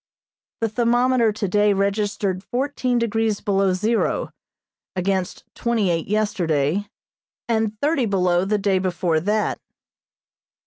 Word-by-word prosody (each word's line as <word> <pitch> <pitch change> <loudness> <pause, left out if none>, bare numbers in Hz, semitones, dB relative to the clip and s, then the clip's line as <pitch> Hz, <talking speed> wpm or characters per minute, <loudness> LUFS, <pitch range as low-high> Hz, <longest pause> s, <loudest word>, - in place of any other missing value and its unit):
The 225 - +1
thermometer 240 +1 +2
today 205 0 +1
registered 200 -1 -1
fourteen 255 +1 -1
degrees 225 -2 0
below 195 -2 +1
zero, 215 +5 0 0.6
against 185 0 -1
twenty 225 -6 0
eight 165 -1 -1
yesterday 195 -4 0 0.6
and 220 -2 0
thirty 285 -5 +1
below 180 -3 +2
the 210 +2 +1
day 195 -2 +1
before 180 -3 0
that. 210 +5 0
205 Hz, 105 wpm, -22 LUFS, 185-225 Hz, 0.6 s, thermometer